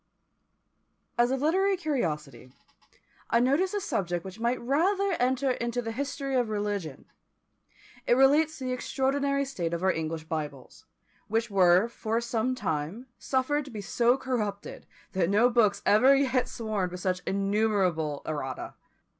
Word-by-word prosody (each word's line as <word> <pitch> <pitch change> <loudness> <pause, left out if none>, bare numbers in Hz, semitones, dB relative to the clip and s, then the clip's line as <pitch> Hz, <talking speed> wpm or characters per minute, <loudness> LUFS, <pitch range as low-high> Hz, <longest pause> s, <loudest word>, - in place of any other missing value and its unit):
As 240 0 +3
a 265 - 0
literary 380 +7 +2
curiosity, 150 - -3 0.8
I 235 - +3
notice 290 - +2
a - - +1
subject 175 - -2
which 190 +3 -9
might 235 +2 0
rather 375 +10 +1
enter 260 +2 +1
into 235 -1 -2
the 225 -2 -3
history 275 +2 -4
of 245 -3 +1
religion. 205 -8 -3 1.0
It 240 - +5
relates 295 +4 +4
to 265 - -8
the 255 - -2
extraordinary 275 +2 0
state 170 -11 -3
of 170 - -5
our 190 - +4
English 160 -1 -3
Bibles, 150 -5 -6 0.4
which 225 +1 -1
were 185 +1 +5
for 225 -1 -2
some 235 +2 -1
time 185 - -3
suffered 280 +3 0
to - - -10
be 215 -4 -6
so 235 +5 +2
corrupted 215 -7 -4 0.2
that 185 -3 0
no 225 +5 +4
books 210 -4 +2
ever 255 +7 +6
yet 260 -2 +1
swarmed 215 -5 -2
with 180 - -6
such 180 -1 -1
innumerable 195 -7 0
errata! 135 -4 -4
230 Hz, 145 wpm, -28 LUFS, 185-265 Hz, 1.0 s, ever